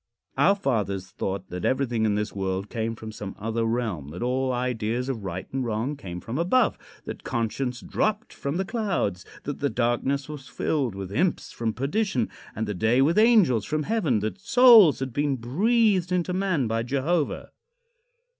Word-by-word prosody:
Our 200 Hz, -, +4 dB
fathers 100 Hz, -, -2 dB
thought 95 Hz, 0 st, -4 dB
that 90 Hz, 0 st, -6 dB
everything 120 Hz, -4 st, +1 dB
in 105 Hz, -1 st, +2 dB
this 105 Hz, 0 st, -2 dB
world 95 Hz, 0 st, -3 dB
came 115 Hz, 0 st, -2 dB
from 110 Hz, 0 st, -8 dB
some 100 Hz, -2 st, -7 dB
other 115 Hz, +2 st, -2 dB
realm; 115 Hz, -, -2 dB
that 90 Hz, +8 st, -6 dB
all 130 Hz, +1 st, 0 dB
ideas 125 Hz, 0 st, -1 dB
of 115 Hz, -6 st, -3 dB
right 95 Hz, -1 st, -4 dB
and 135 Hz, -1 st, -1 dB
wrong 115 Hz, +5 st, -2 dB
came 90 Hz, -10 st, -7 dB
from 115 Hz, -, -5 dB
above; 220 Hz, +8 st, +3 dB, 0.3 s
that -, -, -7 dB
conscience 120 Hz, +2 st, -2 dB
dropped 215 Hz, +2 st, -1 dB
from 140 Hz, +4 st, -3 dB
the 190 Hz, -, -1 dB
clouds; 190 Hz, -, -1 dB, 0.2 s
that 145 Hz, -, -5 dB
the 145 Hz, -, +1 dB
darkness 125 Hz, +3 st, 0 dB
was 145 Hz, -3 st, -8 dB
filled 130 Hz, -5 st, -1 dB
with 95 Hz, -1 st, -6 dB
imps 170 Hz, -, 0 dB
from 115 Hz, -1 st, -2 dB
perdition, 140 Hz, -, 0 dB, 0.3 s
and 110 Hz, -, -2 dB
the 105 Hz, -, -2 dB
day 110 Hz, +7 st, +3 dB
with 165 Hz, +8 st, +3 dB
angels 210 Hz, -, +5 dB
from 155 Hz, +7 st, -1 dB
heaven; 160 Hz, -, +1 dB
that 110 Hz, -, -3 dB
souls 225 Hz, -, +7 dB
had 130 Hz, -2 st, -3 dB
been 145 Hz, 0 st, +1 dB
breathed 185 Hz, -, +2 dB
into 180 Hz, 0 st, 0 dB
man 185 Hz, -7 st, +1 dB
by 115 Hz, 0 st, 0 dB
Jehovah. 140 Hz, +6 st, -1 dB
125 Hz, 175 wpm, -25 LUFS, 110-165 Hz, 0.3 s, souls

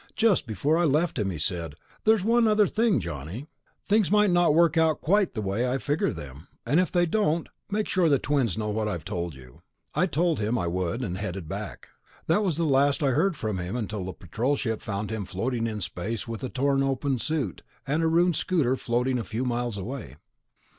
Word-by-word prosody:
Just 215 Hz, -, +3 dB
before 145 Hz, -, +1 dB
I -, -, +3 dB
left 155 Hz, 0 st, +1 dB
him, 100 Hz, -2 st, 0 dB
he 90 Hz, -, -4 dB
said, 80 Hz, 0 st, -3 dB, 0.3 s
'There's 220 Hz, -3 st, +4 dB
one 230 Hz, +2 st, +4 dB
other 210 Hz, -1 st, +4 dB
thing, 220 Hz, +1 st, +2 dB
Johnny. 80 Hz, -, -6 dB, 0.4 s
Things 210 Hz, -2 st, +3 dB
might 210 Hz, -1 st, +4 dB
not 175 Hz, -3 st, +4 dB
work 170 Hz, 0 st, +4 dB
out 160 Hz, -1 st, +3 dB
quite 195 Hz, 0 st, +2 dB
the 110 Hz, -, -2 dB
way 105 Hz, +6 st, 0 dB
I 130 Hz, -, +1 dB
figure 150 Hz, +8 st, 0 dB
them, 70 Hz, +3 st, -9 dB, 0.2 s
and 155 Hz, -, +3 dB
if 185 Hz, -, +1 dB
they 175 Hz, -1 st, +3 dB
don't... 170 Hz, -3 st, +1 dB, 0.2 s
make 210 Hz, +1 st, -1 dB
sure 180 Hz, -4 st, +2 dB
the 140 Hz, -, +5 dB
twins 135 Hz, -8 st, 0 dB
know 105 Hz, -1 st, -2 dB
what 110 Hz, 0 st, -1 dB
I've 85 Hz, -6 st, -4 dB
told 85 Hz, -3 st, -3 dB
you.' 65 Hz, -2 st, -15 dB, 0.3 s
I 185 Hz, -, +2 dB
told 165 Hz, +1 st, +1 dB
him 110 Hz, +3 st, 0 dB
I 90 Hz, -, -1 dB
would, 90 Hz, +7 st, -2 dB
and 95 Hz, -4 st, -3 dB
headed 95 Hz, -4 st, -4 dB
back. -, -, -6 dB, 0.4 s
That 170 Hz, +6 st, +2 dB
was 175 Hz, -7 st, 0 dB
the 170 Hz, -, +1 dB
last 140 Hz, +1 st, +3 dB
I 135 Hz, -, +3 dB
heard 165 Hz, +5 st, +1 dB
from 105 Hz, -6 st, -2 dB
him 90 Hz, +5 st, -4 dB
until 105 Hz, -4 st, -3 dB
the 95 Hz, -, -4 dB
Patrol 120 Hz, -, -1 dB
ship 115 Hz, -5 st, -2 dB
found 105 Hz, +1 st, -4 dB
him 110 Hz, -2 st, -2 dB
floating 115 Hz, +5 st, -2 dB
in 110 Hz, -2 st, -4 dB
space 100 Hz, +6 st, -4 dB
with 115 Hz, +2 st, -5 dB
a 130 Hz, -, -2 dB
torn 135 Hz, +1 st, +1 dB
open 135 Hz, -1 st, 0 dB
suit 140 Hz, -, -2 dB, 0.2 s
and 150 Hz, +4 st, 0 dB
a 165 Hz, -, +2 dB
ruined 170 Hz, +1 st, +3 dB
scooter 145 Hz, -9 st, +1 dB
floating 125 Hz, +1 st, 0 dB
a -, -, -2 dB
few 115 Hz, +4 st, -3 dB
miles 120 Hz, -3 st, -1 dB
away." 100 Hz, -, -6 dB
130 Hz, 215 wpm, -26 LUFS, 105-165 Hz, 0.4 s, the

